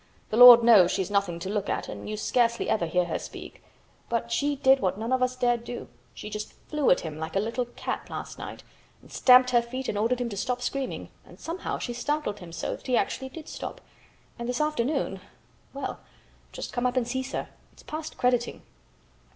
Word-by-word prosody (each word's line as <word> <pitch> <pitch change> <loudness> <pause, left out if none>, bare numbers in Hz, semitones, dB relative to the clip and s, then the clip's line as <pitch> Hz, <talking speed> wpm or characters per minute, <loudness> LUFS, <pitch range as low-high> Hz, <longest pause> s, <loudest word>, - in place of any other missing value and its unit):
The - - 0
Lord 245 -1 +11
knows 210 -7 +7
she's 190 +1 -2
nothing 200 -4 +1
to 185 - -4
look 205 -1 -2
at - - -2
and - - -7
you 215 - -3
scarcely 235 +1 +1
ever 175 -6 +1
hear 180 +2 +1
her 170 - -3
speak, - - -10 0.5
but 235 0 -2
she 285 +5 +1
did 270 -1 +4
what 190 -4 0
none 225 +3 -4
of 260 - +2
us 255 0 +1
dare 245 -1 +2
do. 240 +1 -8 0.3
She - - -8
just 210 0 -6 0.2
flew 300 -3 +1
at - - +4
him 155 -2 -6
like 160 +3 -5
a - - +3
little 230 +4 -1
cat 240 - -5
last - - -7
night, - - -8 0.4
and - - -17
stamped 250 0 +6
her 240 -1 +5
feet 255 +2 -6
and 205 - -1
ordered 235 +4 +1
him 245 -1 -2
to 200 - -6
stop 250 +4 -2
screaming, 270 +1 -3
and - - -16
somehow 335 +3 -4
she 240 - -4
startled 245 -4 -2
him 175 -3 -10
so 165 - -3
that - - -14
he 250 -2 +3
actually 265 -1 -1
did 315 +3 -10
stop, - - -6 0.6
and 235 +1 -4
this 250 - -1
afternoon—well 285 -1 -3 0.5
just - - -7
come 245 0 +1
up 250 +1 -2
and 240 -2 +1
see, 260 +2 -1
sir. 270 +1 -5 0.2
It's - - -19
past 310 0 -6
crediting." 245 -1 0
240 Hz, 210 wpm, -27 LUFS, 210-260 Hz, 0.6 s, Lord